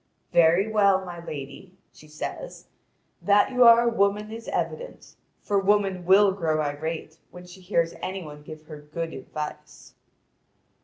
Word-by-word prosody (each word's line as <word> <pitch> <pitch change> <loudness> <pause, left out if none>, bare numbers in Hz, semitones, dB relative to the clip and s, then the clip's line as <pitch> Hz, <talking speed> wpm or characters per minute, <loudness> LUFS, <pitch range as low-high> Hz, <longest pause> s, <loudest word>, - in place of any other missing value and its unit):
"Very 170 +4 +4
well, 200 -3 +2
my 175 -2 -8
lady," 150 +5 -9 0.2
she 155 - -17
says; 155 - -7 0.6
"that 205 +5 +3
you 250 -1 +4
are 235 0 +8
a - - +1
woman 205 0 0
is 225 0 -9
evident, - - -5 0.3
for 200 -1 +1
woman 195 -2 +1
will 195 +2 +5
grow 165 -5 -1
irate 155 +2 -4
when 180 0 -12
she 180 +1 -14
hears 170 -3 0
any 190 0 -4
one 150 -1 -11
give 155 +1 -11
her 150 -1 -11
good 165 +2 -6
advice." 150 +3 -8
180 Hz, 150 wpm, -25 LUFS, 155-200 Hz, 0.6 s, are